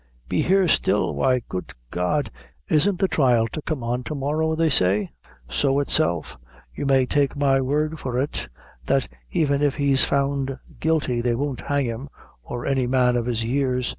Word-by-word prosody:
"Be - - 0
here 190 0 +3
still! 190 +3 +2
why, 125 -2 +1
good 90 - -6 0.2
God! 105 +8 -1 0.4
isn't 180 +5 +3
the 190 - +2
thrial 125 -9 +3
to 155 - -5
come 150 -5 -4
on 120 +2 -2
to 155 - -4
morrow, 155 +3 0
they 160 -1 +2
say?" 95 -3 +2 0.4
"So 140 - +1
itself; 85 - +1 0.4
you 135 - -4
may 135 -1 +4
take 140 +1 +1
my 135 -2 +3
word 150 +4 -1
for 125 -2 -3
it, 135 - -2 0.4
that - - +2 0.2
even 140 -3 +1
if 145 -2 +2
he's 140 -2 +3
found 140 -1 0 0.2
guilty, 145 -7 +1
they 120 -1 +1
won't 140 0 -3
hang 145 -1 0
him, 120 +4 -5 0.3
or 120 0 -6
any 135 -2 +1
man 125 -1 +3
of 120 -1 -1
his 115 -2 -1
years." 125 0 0
135 Hz, 175 wpm, -23 LUFS, 125-145 Hz, 0.4 s, may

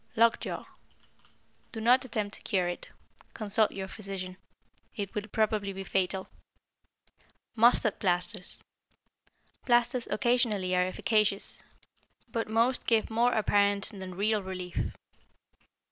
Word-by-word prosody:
=Lockjaw.= 230 0 +2 1.1
Do 225 - -6
not 245 +4 +5
attempt 215 -5 -3
to - - -3
cure 185 -3 0
it. 175 - -5 0.5
Consult 215 0 +2
your 190 -1 -5
physician. 190 -3 -7 0.6
It 200 -2 -4
will 210 0 -3
probably 215 -2 0
be 195 0 -6
fatal. 190 0 -1 1.3
=Mustard 230 -2 +4
Plasters.= 180 +1 0 1.0
Plasters 240 0 +2
occasionally 230 -7 +1
are 180 0 +3
efficacious, 210 +1 +1 0.7
but 230 -1 -1
most 230 +4 +1
give 225 -1 +2
more 235 +2 +3
apparent 205 -2 +2
than 190 -4 -8
real 210 +2 +1
relief. 185 -2 -5
205 Hz, 110 wpm, -29 LUFS, 190-225 Hz, 1.3 s, not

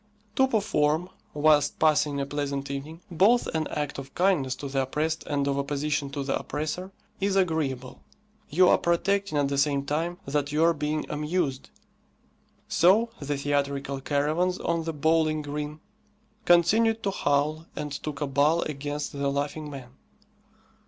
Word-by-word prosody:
To 265 - +4
perform, 175 - +1 0.3
whilst 150 -1 +3
passing 150 -2 +2
a 140 - -1
pleasant 140 -1 -3
evening, 150 +5 -6
both 205 +9 +4
an 160 -1 -2
act 150 -2 -3
of 135 0 -10
kindness 170 -9 +2
to 140 - -6
the 135 0 0
oppressed 155 +4 -1
and 140 -1 0
of 140 0 0
opposition 145 0 -1
to 140 0 -4
the 135 - -1
oppressor 155 +6 -4 0.3
is 195 0 0
agreeable. 155 -9 -1 0.5
You 180 +5 +5
are - - +5
protecting 195 +1 +1
at 145 -1 +2
the 140 0 -1
same 140 -1 +1
time 165 +5 -2
that 145 +1 -1
you 155 +2 +2
are 170 0 +5
being 150 0 -2
amused. 150 -2 -2 1.0
So 210 +7 +4
the 145 0 -2
theatrical 140 -1 -1
caravans 155 +6 0
on 165 -1 -1
the 165 - -2
bowling 155 0 +1
green 150 +1 -5 0.6
continued 220 +7 +4
to 195 - 0
howl 155 -1 0
and 150 -1 -4
to 155 - -3
cabal 145 +3 +1
against 145 0 -4
the 140 0 -1
Laughing 145 +2 -3
Man. 130 -4 -9
150 Hz, 150 wpm, -27 LUFS, 140-165 Hz, 1.0 s, You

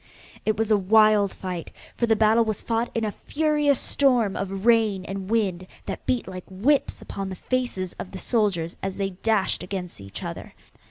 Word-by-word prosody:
It 215 -1 +2
was 225 0 0
a 210 - +6
wild 210 0 +5
fight, 180 -3 -5 0.3
for 235 - 0
the 225 - +4
battle 220 +2 +4
was 215 -3 -2
fought 230 +1 0
in 230 -1 +1
a 210 - -1
furious 295 +1 +1
storm 245 -8 +2
of 195 +1 -4
rain 220 -5 +3
and 195 0 -5
wind 190 -5 0 0.2
that - - -6
beat 250 - 0
like 185 -1 -7
whips 240 +10 +1
upon 195 -1 -5
the 190 - -5
faces 215 -5 -2
of 185 - -5
the 190 - -8
soldiers 190 -7 0
as 195 0 -3
they 195 -1 -1
dashed 200 +1 0
against 180 - -5
each 100 0 -8
other. - - -7
205 Hz, 185 wpm, -25 LUFS, 190-230 Hz, 0.3 s, a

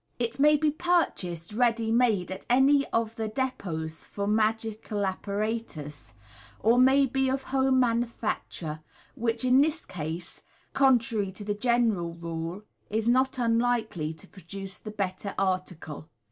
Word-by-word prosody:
It 240 +1 -2
may 300 +2 +6
be 305 0 +2
purchased 250 - 0
ready 230 -1 +2
made 225 -7 +2
at 190 - -6
any 275 +3 +4
of 230 -1 -1
the 220 -1 -2
depots 180 - -3
for 200 - -4
magics' 220 +1 0
apparatus, 200 - -3 0.4
or 230 +4 +4
may 265 +2 +6
be 265 0 0
of 265 +1 -1
home 265 -1 +2
manufacture, 230 -9 -2 0.3
which 230 +1 0
in 255 +2 +6
this 315 +2 0
case 165 +1 -5 0.3
(contrary 235 -7 +3
to 205 - -7
the 205 0 -1
general 215 -6 +1
rule) 170 +3 -5 0.3
is 220 +2 -1
not 260 +2 +3
unlikely 230 -8 +1
to 160 - -13
produce 195 0 -8
the 215 - -8
better 200 -1 -3
article. 185 -5 -2
220 Hz, 135 wpm, -28 LUFS, 185-250 Hz, 0.4 s, may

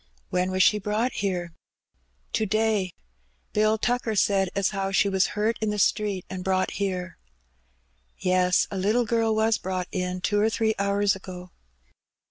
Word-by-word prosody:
"When 180 +1 +1
was 185 0 +3
she 210 - +4
brought 210 +5 -1
here?" 180 -4 -3 0.8
"To 220 - +1
day. 215 -3 +1 0.6
Bill 215 0 +3
Tucker 240 -1 -1
said 195 -1 +2
as 200 +1 +1
'ow 195 -1 -1
she 195 +1 +3
was 190 -1 +2
hurt 215 +2 0
in 215 - 0
the 210 - -2
street 200 -2 +1
an' 185 -1 -6
brought 185 0 0
here." 185 -2 -3 1.0
"Yes, 180 -1 +2
a 195 - -3
little 215 +6 +2
girl 225 -1 +1
was 220 +1 +2
brought 185 -1 -3
in 180 0 -2
two 205 +3 0
or 220 - +3
three 220 0 +1
hours 200 0 +2
ago." 180 -1 -9
200 Hz, 160 wpm, -25 LUFS, 185-215 Hz, 1.0 s, she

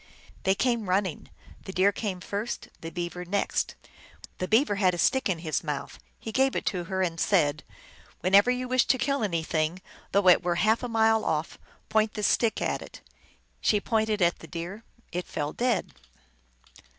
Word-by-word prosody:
They 190 +1 +4
came 235 -3 0
running; 185 -4 -1 0.4
the 190 - -5
deer 190 +2 +3
came 195 -3 -4
first, 205 +5 -4
the 165 - -6
beaver 175 +1 -4
next. 195 +3 -1 0.6
The 185 - -2
beaver 220 0 +3
had 185 -3 +3
a - - -6
stick 265 +7 +2
in 180 - +1
his 160 -2 -2
mouth; 145 -2 -5 0.2
he 220 - -7
gave 265 +3 +2
it - - -2
to 175 -2 -3
her, 190 +1 -1
and 165 -2 -2
said, 150 -7 +2 0.3
" - - -25
When 185 +1 -1
ever 200 +5 +7
you 250 0 0
wish 255 0 +3
to 260 - +3
kill 275 +1 0
anything, 165 -2 -1 0.3
though 200 -1 +2
it 180 - +7
were 175 -1 +1
half 215 +6 +2
a 250 - -3
mile 225 -1 +3
off, 155 0 -2 0.3
point 220 0 +1
this 210 -1 -1
stick 225 +1 +2
at - - -1
it." - - -11 0.6
She 210 - +3
pointed 220 -1 0
it - - +6
at 170 - 0
the 165 - -11
deer; 175 +7 -6 0.3
it 180 +1 -4
fell 145 0 -3
dead. 245 0 0
195 Hz, 190 wpm, -27 LUFS, 175-220 Hz, 0.6 s, ever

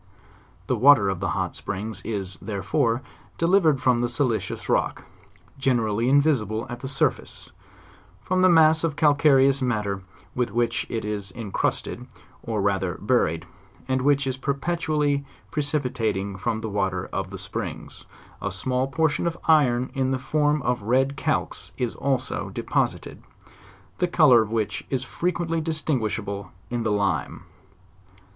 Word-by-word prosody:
The 125 - 0
wa 140 +6 +8
ter 100 -5 0
of 95 -2 -2
the 95 0 -1
hot - - -2
springs 105 +3 -4
is, 95 -4 -3
therefore, 110 +4 0 0.3
delivered 165 -4 +3
from 125 -2 +3
the 120 - +1
sili 120 -4 0
cious 95 - -7
rock, - - 0 0.5
generally 120 -3 +1
invisible 130 -7 +2
at 120 - -5
the 135 - -6
surface, 135 0 -1 0.7
from 185 0 0
the 185 - +6
mass 160 -1 +5
of 160 -3 0
calcareous 145 -3 +4
matter 105 -6 -1 0.3
with 125 -1 0
which 120 +3 0
it 115 -2 -3
is 105 -2 -3
incrusted, 110 -5 -3 0.3
or 110 -3 -2
rather 95 -3 0
bu 110 +5 0
ried, 85 -8 +1 0.4
and 130 0 +1
which 140 0 +3
is 130 -1 -2
perpetually 145 0 0 0.3
precipitating 125 -9 -1
from 110 +3 -2
the 110 - -4
water 95 -2 -1
of 95 -2 -2
the 95 - -7
springs; 95 -1 -6 0.4
a 100 - -2
small 125 +7 -1
proportion 160 +3 0
of 165 -1 -2
iron, 130 -6 +3
in 135 -2 0
the 130 - 0
form 150 +2 +1
of 125 -1 0
red 130 +6 +1
calx, 135 - -2
is 125 -2 -1
also 130 -2 -2
deposited: - - -2 0.8
the 180 - +2
color 150 -9 +6
of 110 - -3
which 110 -2 -1
is 130 -2 -1
frequently 170 +1 -1
dis 155 -1 -3
tinguishable 105 -7 -2 0.2
in 120 -1 -1
the 110 -1 0
lime. 100 -8 -1
125 Hz, 150 wpm, -24 LUFS, 105-145 Hz, 0.8 s, wa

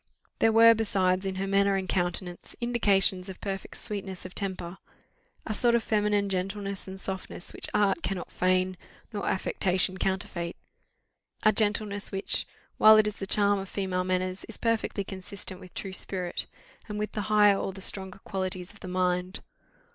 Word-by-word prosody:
There 225 - +5
were, 230 +1 +8
besides, 195 -4 +1
in 190 - -2
her 190 +1 -2
manner 200 0 +3
and 190 -1 -2
countenance, 175 -1 -2
indications 200 -6 +2
of 185 - -8
perfect 195 -1 -5
sweetness 195 -4 -3
of 185 - -8
temper, 185 -2 -4 0.7
a 220 - -2
sort 235 +2 +3
of 235 - +2
feminine 210 -1 +1
gentleness 195 +1 -3
and 190 0 -7
softness 190 -2 -6
which - - -2
art 210 +9 +2
cannot 190 - -3
feign 185 0 +1 0.4
nor 205 - -3
affectation 185 0 +1
counterfeit; 180 -2 -2 0.9
a 215 - +6
gentleness 205 -1 +1
which, 195 0 0 0.3
while 215 0 +9
it 215 - +5
is 210 - -3
the 195 - -5
charm 205 0 +3
of 195 -1 -6
female 185 -2 -1
manners, 185 +1 -1
is 225 - -5
perfectly 225 -3 0
consistent 190 -1 -5
with 185 -2 -14
true 190 -2 -5
spirit, 180 -2 -3 0.4
and 210 - -4
with 210 0 -2
the 210 - -3
higher 210 -1 +6
or - - -2
the 190 - -11
stronger 190 -1 -2
qualities 185 -2 -3
of - - -16
the - - -8
mind. 180 +1 -1
195 Hz, 170 wpm, -28 LUFS, 185-205 Hz, 0.9 s, while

